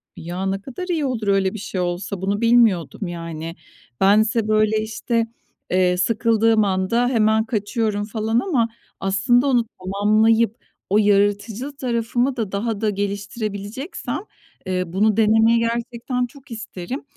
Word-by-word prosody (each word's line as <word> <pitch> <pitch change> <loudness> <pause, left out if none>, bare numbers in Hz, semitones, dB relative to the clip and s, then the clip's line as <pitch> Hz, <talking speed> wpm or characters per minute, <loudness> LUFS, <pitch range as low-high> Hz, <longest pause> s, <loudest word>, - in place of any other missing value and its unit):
Ya, 175 +3 -5
ne 195 +1 -1
kadar 275 - -7
iyi 330 -5 0
olur 235 -6 -2
öyle 195 -1 +2
bir 220 - -6
şey 195 -2 -3
olsa, 180 +2 -3
bunu 200 +3 -1
bilmiyordum, 220 - +3
yani. 165 -1 -6 0.5
Bense, 215 +3 +4
böyle, 215 0 +2
işte, 225 +1 -1 0.4
eee, 180 0 +3
sıkıldığım 225 +2 +3
anda 195 +5 +1
hemen 220 -3 +2
kaçıyorum, 215 -1 -1
falan, 220 +1 0
ama 250 -8 +1 0.3
aslında 200 +7 +2
onu 245 -4 +3
tamamlayıp 215 +4 +2 0.3
o 200 - +3
yaratıcı 205 +5 +1
tarafımı 245 +1 0
da 220 -5 -2
daha 210 +1 -2
da 220 - +2
geliştirebileceksem, 205 - -4 0.5
eee, 185 -1 0
bunu 205 +5 +1
denemeyi 225 +1 +4
gerçekten 235 +2 -2
çok 275 +2 -16
isterim. 225 - -6
215 Hz, 135 wpm, -21 LUFS, 195-235 Hz, 0.5 s, Bense